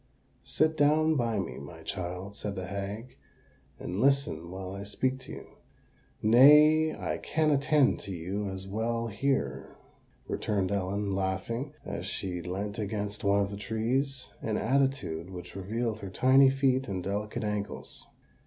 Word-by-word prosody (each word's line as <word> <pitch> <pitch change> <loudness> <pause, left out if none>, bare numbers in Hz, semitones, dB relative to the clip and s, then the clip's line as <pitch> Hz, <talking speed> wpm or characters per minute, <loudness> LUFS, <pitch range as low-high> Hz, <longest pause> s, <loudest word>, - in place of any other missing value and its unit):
"Sit 155 0 +2
down 155 +1 +4
by 115 -5 0
me, 65 -11 -3
my 80 +4 -10
child," 90 +1 -5
said 100 -1 -4
the 95 0 -4
hag, 100 +5 -5 0.6
"and 95 +4 -3
listen 135 - +2
while 95 0 -6
I 100 +1 -6
speak 130 +6 -1
to - - -11
you." - - -10 0.7
"Nay—I 150 +7 +6
can 155 -1 +1
attend 145 0 +3
to 100 - -7
you 95 +4 -3
as 95 0 -6
well 115 +3 -1
here," 135 +6 -1 0.5
returned 100 -3 -1
Ellen, 100 +1 -1
laughing, 100 +9 -2
as 100 -2 -4
she 90 -3 -3
leant 100 +4 -4
against 105 0 -3
one 100 0 +3
of 100 0 -1
the 100 - -5
trees—an 115 +1 -2
attitude 130 - 0
which 90 -1 -9
revealed 110 +3 -2
her 100 - -6
tiny 130 +6 +6
feet 135 -1 +1
and 95 -4 -3
delicate 105 +3 -3
ankles. 105 -1 -4
105 Hz, 145 wpm, -29 LUFS, 95-130 Hz, 0.7 s, Nay—I